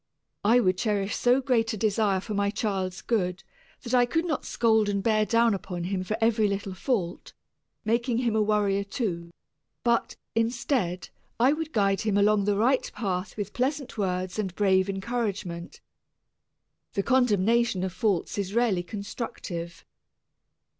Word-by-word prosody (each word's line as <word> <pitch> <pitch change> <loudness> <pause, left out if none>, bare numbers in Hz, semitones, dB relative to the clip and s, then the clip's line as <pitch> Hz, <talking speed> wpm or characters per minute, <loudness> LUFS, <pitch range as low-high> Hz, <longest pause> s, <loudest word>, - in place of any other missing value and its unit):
I 230 +4 +5
would 185 -5 +2
cherish 205 -3 0
so 245 +2 +3
great 230 -4 +1
a - - -3
desire 205 -2 +1
for 215 - -5
my 200 0 +1
child's 195 -3 -2
good 190 -5 -1 0.4
that 240 -1 -5
I 245 -1 +5
could 325 +7 0
not 310 -5 -2
scold 220 -3 +2
and 200 -1 -1
bear 215 -1 +2
down 230 -1 +3
upon 180 -3 -4
him 185 +1 -2
for 215 +4 -2
every 225 -1 +3
little 200 -1 -3
fault, 185 -3 -2 0.5
making 235 +2 +1
him 235 -3 0
a 220 - +3
worrier 205 -2 +2
too, 185 -5 -3 0.5
but, 235 -1 +1 0.2
instead, 230 -5 -1 0.3
I 255 +4 +5
would 315 0 -4
guide 200 -5 +2
him 210 -2 +1
along 205 0 +3
the 205 -1 +1
right 250 +5 +2
path 190 -2 -3
with 205 -1 -4
pleasant 275 +2 -2
words 185 -1 -2
and 190 -4 -2
brave 190 -1 +3
encouragement. 195 -4 -3 1.1
The 200 - 0
condemnation 235 -4 +2
of 190 -2 -3
faults 200 -1 0
is 200 +1 -3
rarely 230 -7 +2
constructive. 185 -3 -6
210 Hz, 155 wpm, -27 LUFS, 190-235 Hz, 1.1 s, I